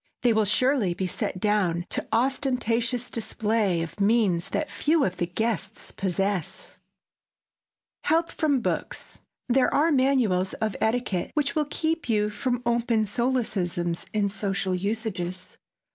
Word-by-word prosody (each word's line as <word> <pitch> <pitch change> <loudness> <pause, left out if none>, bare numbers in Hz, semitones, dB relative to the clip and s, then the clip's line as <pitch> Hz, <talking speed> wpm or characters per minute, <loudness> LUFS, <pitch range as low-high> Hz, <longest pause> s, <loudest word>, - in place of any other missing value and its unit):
They 240 -2 +4
will 215 -1 +3
surely 210 -3 +2
be 185 - -2
set 185 0 -3
down 185 -5 +1
to - - -3
ostentatious 245 -1 +1
display 215 -5 0
of 165 - -8
means 200 -5 +2
that 305 - -1
few 310 0 +1
of 185 -6 -1
the 175 - -1
guests 220 +5 -3
possess. 195 -2 -2 1.2
[Sidenote: - - -18
HELP 330 +2 +2
FROM 290 -4 +1
BOOKS] - - -4 0.3
There 255 +1 +3
are 320 +3 +3
manuals 255 -10 +2
of 220 -2 -2
etiquette 220 -5 0
which 285 -2 +1
will 300 -2 0
keep 320 -2 -1
you 210 -1 +2
from 245 +2 -2
open 235 -2 +2
solecisms 195 -7 -1
in 210 -1 +1
social 195 -2 -2
usages. 185 -2 -3
220 Hz, 135 wpm, -26 LUFS, 190-250 Hz, 1.2 s, They